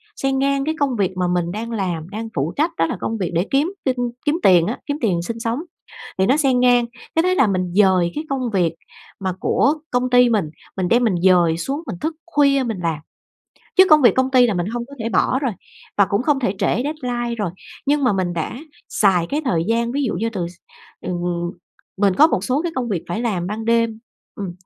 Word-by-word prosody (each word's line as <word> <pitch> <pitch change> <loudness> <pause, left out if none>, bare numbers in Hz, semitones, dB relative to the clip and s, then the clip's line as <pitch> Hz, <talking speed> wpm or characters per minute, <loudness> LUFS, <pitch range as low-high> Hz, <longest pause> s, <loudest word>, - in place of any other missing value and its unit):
xen 270 0 -1
ngang 275 0 +1
cái 315 +1 -1
công 275 -3 +1
việc 190 -3 -1
mà 180 -1 +1
mình 175 -1 0
đang 225 +4 -5
làm, 180 -6 -3
đang 220 +3 -5
phụ 145 +5 -1
trách 315 +4 +1
đó 165 - +3
là 165 - -3
công 225 - -2
việc 185 -5 -2
để 175 +4 0
kiếm 295 +7 +1
tin 260 -2 +1 0.3
kiếm 300 +2 +2
tiền 175 -3 +5
á, 230 - -3
kiếm 290 0 -2
tiền 185 -8 +1
sinh 225 +7 -5
sống 230 +4 -2 0.6
thì 190 - +3
nó 260 +7 +3
xen 270 -4 +2
ngang 245 -1 +4 0.3
cái 325 - +3
thế 365 +1 +2
là 265 - +4
mình 185 -3 -1
dời 190 -4 +4
cái 305 - -4
công 260 -3 -1
việc 175 -4 +2 0.5
mà 190 -2 -2
của 280 +9 +2 0.2
công 250 0 +1
ty 245 -1 +5
mình, 205 -9 +1 0.3
mình 185 -1 0
đem 240 +5 +3
mình 220 -6 +2
dời 175 -3 +4
xuống 275 - -3
mình - - -4
thức 315 +1 -2
khuya 280 -5 +3
mình 225 -5 -3
làm. 165 -2 -1 0.8
Chứ 375 - +8
công 305 -1 +7
việc 240 -7 +6
công 260 0 +1
ty 255 -2 +6
là 220 - 0
mình 175 -2 -1
hông 235 +2 -4
có 280 - -14
thể 225 0 -2
bỏ 255 +3 +2
rồi 270 -4 -1 0.5
và 200 - +5
cũng 200 +2 0
không 290 -1 +2
thể 205 -6 -1
trễ 245 - +1
deadline 245 -5 -3
rồi, 205 -6 -2 0.3
nhưng 290 +1 +2
mà 250 - +3
mình 185 -2 -1
đã 165 -2 -3 0.4
xài 180 -5 +2
cái 295 - -1
thời 170 -10 +1
gian 235 +1 +1
ví 285 +3 -1
dụ 250 - -1
như 225 +6 -1
từ 185 -6 -3
s 175 - -13 0.5
ừ, 185 - -4 0.9
mình 195 -1 +3
có 300 +11 +6
một 195 - -1
số 255 +6 0
cái 345 0 -3
công 245 -2 -2
việc 185 -6 -2
phải 195 +7 -2
làm 195 -7 -1
ban 215 +3 -4
đêm, 230 -1 +1 0.4
ừm, 195 -3 -5
230 Hz, 240 wpm, -20 LUFS, 185-270 Hz, 0.9 s, Chứ